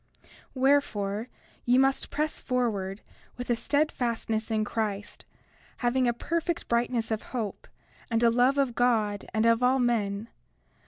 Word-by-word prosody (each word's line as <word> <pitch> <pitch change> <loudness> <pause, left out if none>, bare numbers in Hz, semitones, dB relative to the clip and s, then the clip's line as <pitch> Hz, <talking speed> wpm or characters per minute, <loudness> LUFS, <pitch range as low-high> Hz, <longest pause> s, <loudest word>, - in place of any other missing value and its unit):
31:20 - - -25 0.3
Wherefore, 235 -6 +1 0.4
ye 245 +1 +3
must 270 +1 +2
press 305 +1 -2
forward 215 -6 -1 0.4
with 245 0 -3
a - - +4
steadfastness 235 -6 -1
in 220 -1 +1
Christ, 205 -2 -4 0.5
having 250 +1 +1
a - - +4
perfect 335 +7 -2
brightness 235 -1 0
of 220 - -1 0.2
hope, 215 -4 -4 0.4
and 230 0 +1
a 230 - +6
love 250 +4 +3
of 270 -4 +2
God 220 -5 +1
and 220 0 +1
of 230 +1 +4
all 250 +2 +4
men. 225 -3 0
235 Hz, 145 wpm, -28 LUFS, 220-255 Hz, 0.5 s, a